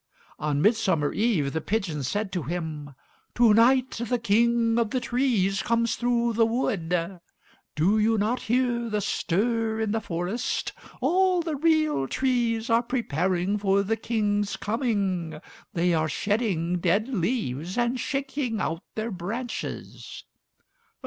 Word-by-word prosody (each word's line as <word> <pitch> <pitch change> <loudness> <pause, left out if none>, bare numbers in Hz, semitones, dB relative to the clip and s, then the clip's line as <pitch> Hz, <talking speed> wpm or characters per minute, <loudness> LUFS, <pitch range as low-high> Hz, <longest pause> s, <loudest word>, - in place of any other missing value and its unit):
On 150 0 0
Midsummer 195 -9 +2
Eve, 195 -12 +1
the 160 - -1
pigeons 165 - -2
said 205 +4 -2
to 180 - -2
him, 155 -2 -5 0.4
"To 235 -3 +5
night 255 +4 +4
the 240 +1 0
King 235 +1 +2
of 230 -2 +1
the 255 - 0
Trees 235 -7 +1
comes 230 0 +1
through 235 0 +1
the 225 +1 +4
wood. 180 -7 -1 0.6
Do 190 +8 +3
you 220 +1 +3
not 220 +5 0
hear 240 -1 +1
the 210 -1 0
stir 220 +3 0
in 220 -2 0
the 225 +1 0
forest? 175 +7 -2 0.3
All 360 +5 +3
the 320 -2 -2
real 310 - +2
trees 240 - 0
are 230 -1 +3
preparing 190 - -1
for 200 0 +2
the 220 +3 0
King's 205 -3 -1
coming; 200 - -1 0.4
they 175 +1 +2
are 160 -1 +1
shedding 180 - 0
dead 195 +6 +1
leaves 180 - -2
and 240 +1 +1
shaking 265 -3 -2
out 165 -2 -2
their 220 +1 -3
branches." 210 +7 -6
220 Hz, 135 wpm, -26 LUFS, 180-240 Hz, 0.6 s, To